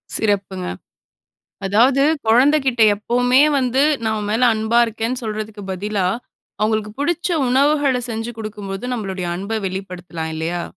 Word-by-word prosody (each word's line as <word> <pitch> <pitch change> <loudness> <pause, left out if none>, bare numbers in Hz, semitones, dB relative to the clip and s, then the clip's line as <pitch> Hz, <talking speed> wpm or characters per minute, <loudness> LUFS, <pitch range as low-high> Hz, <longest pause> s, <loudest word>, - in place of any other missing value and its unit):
சிறப்புங்க. 200 -3 -1 1.0
அதாவது 245 +8 +4 0.3
கொழந்தைகிட்ட 260 0 +4
எப்பவுமே, 245 +5 +3 0.2
வந்து 260 +1 +1 0.2
நான் 220 0 0
உன் 205 - -4
மேல 230 +3 +2
அன்பா 220 +2 +1
இருக்கிறேன்னு 230 +3 -3
சொல்றதுக்கு 215 -1 -5
பதிலா, 195 0 -1 0.5
அவங்களுக்கு 215 0 0
பிடிச்ச 345 +4 0 0.2
உணவுகளை 275 -1 +2
செஞ்சு 225 +1 -4
குடுக்கும்போது, 205 -1 -6
நம்மளுடைய 190 -5 -4
அன்ப 200 +4 -5
வெளிப்படுத்தலாம் 180 -4 -5
இல்லையா. 170 +2 -3
220 Hz, 115 wpm, -20 LUFS, 195-250 Hz, 1.0 s, அதாவது